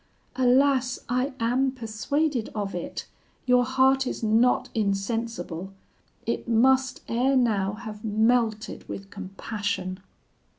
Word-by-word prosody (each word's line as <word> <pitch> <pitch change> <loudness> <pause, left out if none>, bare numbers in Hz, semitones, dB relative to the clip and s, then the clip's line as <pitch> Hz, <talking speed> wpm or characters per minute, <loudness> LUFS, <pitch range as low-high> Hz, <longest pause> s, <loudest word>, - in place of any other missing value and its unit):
Alas! 260 0 +3
I 255 +3 0
am 255 +3 +1
persuaded 255 +3 -1
of 205 -2 -2
it; 175 - -5 0.4
your 250 -1 +5
heart 265 +1 +3
is - - -4
not 225 +3 +3
insensible; 195 -3 -2 0.5
it 235 - -2
must 260 +3 +3
ere 255 +4 +2
now 210 -6 +2
have 215 -1 -8
melted 220 0 +1
with 195 0 -7
compassion.' 195 -1 -4
230 Hz, 110 wpm, -26 LUFS, 210-255 Hz, 0.5 s, your